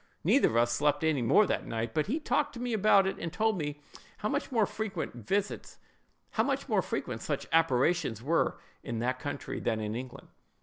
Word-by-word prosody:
Neither - - +5
of 110 - -2
us 120 0 +3
slept 145 +4 +1
any 155 -4 +2
more 165 - +5
that - - -2
night, 115 0 -3
but 155 - 0
he 280 +9 0
talked 295 -1 0
to 235 - -8
me 245 -1 -2
about 205 -2 +5
it, 190 - -2
and 165 - -4
told 220 -1 +1
me 145 -1 -4 0.4
how 210 - -2
much 285 +3 -2
more 225 -4 +3
frequent 185 - -5
such 205 0 -2
apparitions 140 -5 +2
were 165 +5 +1 0.2
in 115 - -4
that 125 +3 -1
country 145 +1 -4
than 115 -2 -1
in 105 0 -3
England." 125 +2 -7
155 Hz, 175 wpm, -30 LUFS, -, 0.4 s, Neither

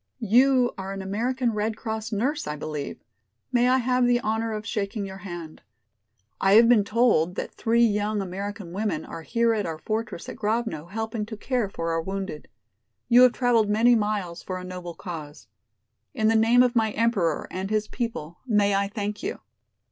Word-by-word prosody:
"You 250 +3 +4
are 190 +1 -4
an 195 0 -5
American 235 +5 -1
Red 215 +1 -1
Cross 220 0 -4
nurse, 250 - -1
I 150 - -3
believe. 150 -1 -5 0.5
May 245 0 +3
I 260 - +4
have 250 0 +2
the 245 0 +3
honor 225 +1 -1
of 215 0 -4
shaking 205 -1 -2
your 190 0 -8
hand. 175 -5 -8 0.8
I 195 - +3
have 230 +2 +8
been 235 -4 +5
told 200 -6 +2
that - - -4
three 235 +1 +3
young 210 -1 0
American 195 0 -5
women 210 +2 -2
are 165 - -8
here 230 +6 +1
at 210 -4 -1
our 160 -1 -4
fortress 215 +1 -4
at - - -7
Grovno 210 -7 -2
helping 220 +3 -3
to 220 -1 -7
care 240 -2 -1
for 165 -3 -3
our 165 0 0
wounded. 190 -3 -5 0.6
You 245 +1 +7
have 250 -1 +7
traveled 235 -4 +2
many 225 +4 +4
miles 205 -6 -1
for 185 - -5
a 180 - -7
noble 180 -2 -7
cause. 155 -4 -8 0.7
In 220 -3 +2
the 225 - +3
name 230 +3 +5
of 250 0 +1
my 220 -2 +2
Emperor 205 -9 +1
and 190 +1 -4
his 215 0 0
people 210 -11 -5
may 205 -3 +3
I 200 0 +1
thank 210 0 -4
you." 400 +7 -3
215 Hz, 185 wpm, -25 LUFS, 190-235 Hz, 0.8 s, have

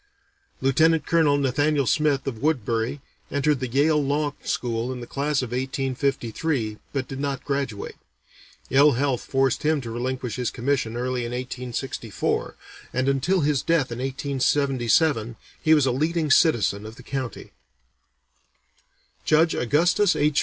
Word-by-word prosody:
Lieutenant 155 +3 +3
Colonel 160 -4 +3
Nathaniel 145 +1 +1
Smith 145 +1 +1
of 120 -5 -4
Woodbury 130 -2 0 0.3
entered 145 0 +1
the 130 - -2
Yale 145 +4 +2
Law 145 +1 0
School 120 0 -2
in 130 - -5
the 120 - -7
class 140 +1 -1
of 120 - -6
1853, 130 -2 -2
but 135 -2 -2
did 135 - -6
not 140 -1 -3
graduate. 140 -7 -3 0.7
Ill 145 +2 +6
health 130 0 0
forced 135 -2 0
him 155 0 +2
to 115 -3 -6
relinquish 125 0 -3
his 125 -2 -1
commission 120 -2 -1
early 125 0 -2
in 120 +1 -4
1864, 125 -2 -3 0.4
and 130 +1 -1
until 145 +7 +2
his 145 -3 +1
death 160 -7 +1
in 120 - -5
1877 135 -2 +1 0.3
he 160 0 +5
was 150 -3 +3
a 130 - +2
leading 155 +3 0
citizen 110 - +3
of 110 - -10
the - - -13
county. 130 -5 -5 1.7
Judge 160 +1 +3
Augustus 170 - +2
H. 145 0 +2
135 Hz, 140 wpm, -24 LUFS, 125-145 Hz, 1.7 s, Ill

